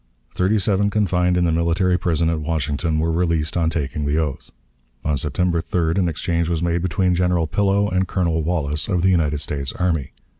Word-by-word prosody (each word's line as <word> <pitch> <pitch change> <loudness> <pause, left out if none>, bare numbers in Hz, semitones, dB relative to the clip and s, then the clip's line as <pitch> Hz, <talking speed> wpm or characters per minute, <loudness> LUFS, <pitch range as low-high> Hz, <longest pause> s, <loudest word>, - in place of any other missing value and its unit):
Thirty 95 +4 +1
seven 100 0 +1
confined 90 -4 +1
in 90 - +2
the 85 - +2
military 85 +3 +1
prison 85 -2 0
at 80 -2 -2
Washington 80 0 -1
were 80 +1 +1
released 80 -2 0
on 85 -2 +2
taking 75 -2 -3
the 75 +2 0
oath. 75 -4 -3 0.6
On 75 -1 +1
September 85 +5 0
3d 85 +1 0
an 90 -2 +2
exchange 85 +1 -1
was 85 -1 -1
made 85 0 0
between 90 +1 +1
General 90 -1 +1
Pillow 100 +5 +1
and 95 -1 0
Colonel 85 -3 0
Wallace, 75 -2 -1
of 90 -4 0
the 95 - +4
United 75 -4 +1
States 70 -3 -3
Army. 80 -6 -1
85 Hz, 190 wpm, -21 LUFS, 80-90 Hz, 0.6 s, the